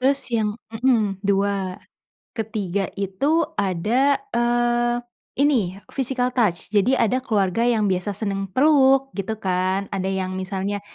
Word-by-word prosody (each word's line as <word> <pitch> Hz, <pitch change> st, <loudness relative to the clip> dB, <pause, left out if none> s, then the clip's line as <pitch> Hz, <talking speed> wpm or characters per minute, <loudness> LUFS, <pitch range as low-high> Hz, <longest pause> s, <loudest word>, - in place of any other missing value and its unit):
Terus, 275 Hz, +2 st, +2 dB
yang 215 Hz, -2 st, +2 dB, 0.2 s
hmm 225 Hz, -5 st, +1 dB
2. 195 Hz, -1 st, 0 dB, 0.5 s
Ke-3 205 Hz, -4 st, -2 dB
itu 275 Hz, -, +1 dB, 0.2 s
ada, 220 Hz, +10 st, +2 dB, 0.2 s
eee, 240 Hz, 0 st, +1 dB, 0.4 s
ini 245 Hz, -10 st, +2 dB, 0.2 s
physical 255 Hz, -2 st, -1 dB
touch 210 Hz, -9 st, 0 dB
jadi 215 Hz, +5 st, +3 dB
ada 255 Hz, +4 st, +1 dB
keluarga 200 Hz, -3 st, +1 dB
yang 230 Hz, -3 st, +2 dB
biasa 185 Hz, +2 st, -2 dB
seneng 195 Hz, -2 st, -3 dB
peluk, 270 Hz, +2 st, +4 dB
gitu 210 Hz, +2 st, -4 dB
kan? 185 Hz, 0 st, 0 dB
Ada 190 Hz, -1 st, -1 dB
yang 190 Hz, -1 st, -2 dB
misalnya 190 Hz, +2 st, -3 dB
210 Hz, 125 wpm, -22 LUFS, 195-245 Hz, 0.5 s, peluk